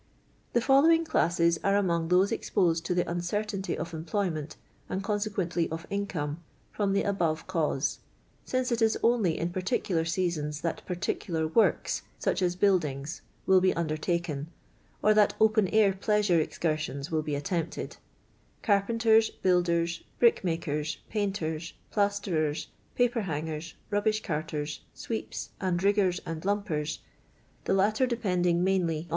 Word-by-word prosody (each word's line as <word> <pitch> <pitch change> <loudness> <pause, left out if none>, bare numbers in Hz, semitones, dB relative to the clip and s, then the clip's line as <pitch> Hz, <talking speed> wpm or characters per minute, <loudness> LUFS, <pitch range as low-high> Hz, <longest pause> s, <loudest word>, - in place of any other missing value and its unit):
The 240 - +3
following 320 +6 +5
classes 170 - +2
are 200 0 +3
among 170 -4 +1
those 180 +3 +3
expti«ed 170 -4 +1
to 180 - 0
the 175 - +2
nnceruiinty 195 +2 -2
of 170 +1 -5
employment, 160 -1 -2 0.3
and 190 +1 -2
conse 205 +1 -1
quently 175 -5 -1
of 165 +1 -5
income, 170 -6 -3 0.3
from 200 -2 0
the 200 - +2
above 170 -6 0
cause. 160 -6 -1 0.4
si::co 255 -1 -1
it 235 - -1
is 220 0 +3
only 225 -9 +3
in 170 +1 -2
particular 185 -2 0
seasons 165 -3 -1
that 165 - -3
particular 175 -2 -2
works, 215 +8 +2 0.2
such - - 0
as 180 -1 +1
buildings, 165 -6 0 0.2
will 190 -1 +5
be 185 - +3
undertaken, 155 -2 -2 0.6
or 215 - +6
that 210 -1 +4
open 215 -2 +4
air 210 -1 +4
pleasure 205 -2 +2
excursions 155 -3 -2
will 160 -1 +1
be 150 -1 -2
attempted: 165 +3 -3 0.7
carpenters, 220 +2 +3
builders, 170 -2 +1 0.2
brickmakers, 165 -9 +1
painters, 175 -6 -2 0.2
plas 205 -1 +1
terers, 155 -6 -1 0.3
paper 245 -1 +2
hangers, 160 -2 -4 0.2
rubbish 215 +1 +1
carters, 150 -1 -3
sweeps, 225 -1 -5
and 185 -2 0
riggers 200 -3 +3
and 165 -2 -5
lumpers, 185 -7 -1 0.6
the - - +1
latter 215 +6 +3
depending 180 -7 +1
mainly 190 +1 +3
THE 190 - +3
MILKMAID'S 165 -3 -1
GARLAND. 170 - -17
180 Hz, 140 wpm, -28 LUFS, 160-205 Hz, 0.7 s, or